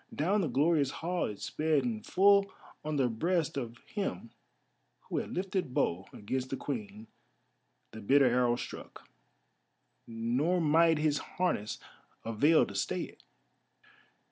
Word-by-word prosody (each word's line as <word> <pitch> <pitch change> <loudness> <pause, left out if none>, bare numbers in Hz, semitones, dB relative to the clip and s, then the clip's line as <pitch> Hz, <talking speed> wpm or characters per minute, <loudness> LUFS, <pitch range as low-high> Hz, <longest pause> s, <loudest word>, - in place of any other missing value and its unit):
Down 195 +7 +1
the 170 - 0
glorious 145 +2 +2
hall 175 +5 -2
it 105 - -7
sped, 155 -2 0
and 110 -3 -3
full 200 +1 +4 0.3
on 155 0 -2
the 135 -3 +2
breast 160 +7 0
of 120 -4 -4
him 115 - -4 0.7
who - - -3
had - - -5
lifted 185 -7 -2
bow 90 +3 0
against 130 +5 -4
the 135 - -3
Queen 110 -5 -5 0.9
the 110 - -9
bitter 140 +6 +4
arrow 125 -1 +3
struck, - - -9 1.0
nor 120 +10 0
might 165 +1 +4
his 150 -1 +1 0.2
harness 175 - 0 0.5
avail 145 +9 +4
to - - -9
stay 100 - -1
it. - - -9
140 Hz, 135 wpm, -31 LUFS, 115-170 Hz, 1.0 s, full